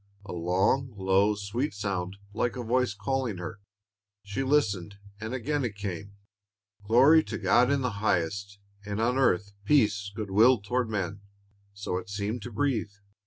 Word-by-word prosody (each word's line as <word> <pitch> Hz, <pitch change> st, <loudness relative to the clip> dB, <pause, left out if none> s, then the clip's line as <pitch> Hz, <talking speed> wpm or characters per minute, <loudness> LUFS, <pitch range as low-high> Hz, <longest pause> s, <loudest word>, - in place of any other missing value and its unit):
A -, -, -7 dB
long, 95 Hz, +9 st, +1 dB
low, 95 Hz, +2 st, +3 dB
sweet 105 Hz, +7 st, -3 dB
sound, 100 Hz, -2 st, -3 dB, 0.2 s
like 115 Hz, +2 st, -1 dB
a 125 Hz, -, -4 dB
voice 120 Hz, -2 st, +1 dB
calling 115 Hz, 0 st, -2 dB
her. 90 Hz, +3 st, -6 dB, 0.6 s
She 100 Hz, +5 st, -3 dB
listened, 105 Hz, -9 st, +1 dB, 0.2 s
and 110 Hz, +1 st, -5 dB
again 135 Hz, +3 st, -1 dB
it 115 Hz, -4 st, -3 dB
came. 100 Hz, 0 st, -6 dB, 0.7 s
"Glory 135 Hz, +9 st, +6 dB
to -, -, -4 dB
God 125 Hz, +1 st, +4 dB
in 140 Hz, -1 st, +2 dB
the 125 Hz, -1 st, 0 dB
highest, 100 Hz, +1 st, 0 dB, 0.3 s
and 100 Hz, 0 st, -4 dB
on 125 Hz, +4 st, +1 dB
earth 100 Hz, -6 st, +2 dB
peace, 105 Hz, -5 st, +2 dB
good 105 Hz, -3 st, -5 dB
will 115 Hz, +5 st, +6 dB
toward 120 Hz, +4 st, -1 dB
men," 100 Hz, -1 st, -3 dB, 0.5 s
so 100 Hz, -2 st, -3 dB
it 90 Hz, +1 st, -11 dB
seemed 105 Hz, +3 st, -3 dB
to 120 Hz, -, -7 dB
breathe. 115 Hz, -3 st, -1 dB
105 Hz, 160 wpm, -28 LUFS, 100-125 Hz, 0.7 s, Glory